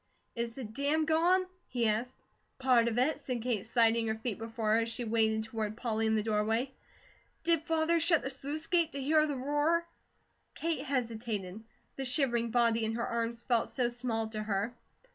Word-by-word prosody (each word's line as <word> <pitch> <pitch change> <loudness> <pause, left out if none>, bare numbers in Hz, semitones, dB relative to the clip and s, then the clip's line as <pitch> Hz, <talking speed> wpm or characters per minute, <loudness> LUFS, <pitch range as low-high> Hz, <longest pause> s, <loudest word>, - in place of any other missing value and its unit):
"Is 235 -1 -3
the 265 - -6
dam 280 +8 0
gone?" 345 +4 +3 0.2
he 240 -2 0
asked. 225 +4 -1 0.4
"Part 255 -3 +4
of 235 0 -1
it," 280 +5 +2
said 250 -5 -4
Kate, 235 -6 0
sliding 230 -1 +3
her 220 - 0
feet 220 -2 -3
before 225 -1 -2
her, 225 - +4
as 230 0 -1
she 230 +2 -4
waded 220 -1 +2
toward 220 -1 -4
Polly 225 -2 0
in 220 - +2
the 215 - +1
doorway. 225 +4 0 0.7
"Did 330 -1 +3
Father 325 +1 +2
shut 330 -1 +3
the 265 - -3
sluice 285 +4 -4
gate, 335 -2 +2
to 280 - -4
hear 305 +3 +3
the 290 -2 -2
roar?" 295 +6 +1 0.7
Kate 330 0 -1
hesitated. 220 -6 -3 0.3
The 270 - -3
shivering 245 -3 +2
body 230 -1 +2
in 220 0 -1
her 235 - -1
arms 235 0 -2
felt 240 -3 +1
so 245 -3 0
small 240 -2 -2
to 215 -1 -4
her. 210 +2 -1
235 Hz, 185 wpm, -31 LUFS, 225-280 Hz, 0.7 s, Part